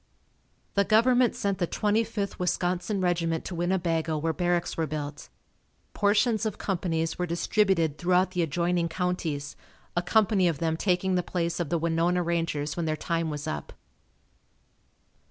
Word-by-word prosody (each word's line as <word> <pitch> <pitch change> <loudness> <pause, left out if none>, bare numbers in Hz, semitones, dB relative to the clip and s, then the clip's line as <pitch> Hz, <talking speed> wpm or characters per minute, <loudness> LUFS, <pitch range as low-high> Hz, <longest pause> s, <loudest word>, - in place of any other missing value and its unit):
The 200 - +3
Government 240 +3 +4
sent 200 -1 -1
the 175 - +1
Twenty 210 +5 +1
fifth 205 -3 -4
Wisconsin 180 +2 0
regiment 170 -2 0
to - - -5
Winnebago 170 -3 0
where 160 +2 -1
barracks 175 0 0
were 160 -1 -1
built. 145 0 -5 0.6
Portions 215 +2 +2
of 220 -3 -2
companies 170 -4 -2
were 180 - 0
distributed 170 -3 +1
throughout 180 +1 +2
the 180 -1 0
adjoining 170 +1 0
counties, 165 -5 -2 0.4
a 175 - +2
company 200 0 +3
of 165 -4 0
them 160 +1 0
taking 185 +2 +1
the 180 - +2
place 170 -1 -2
of 170 -4 -2
the 170 - +1
Winona 170 +2 +1
Rangers 165 -4 -1
when 170 -2 -2
their 155 - 0
time 165 -1 -1
was 150 -1 -5
up. 75 - -5
175 Hz, 155 wpm, -27 LUFS, 165-190 Hz, 0.6 s, Government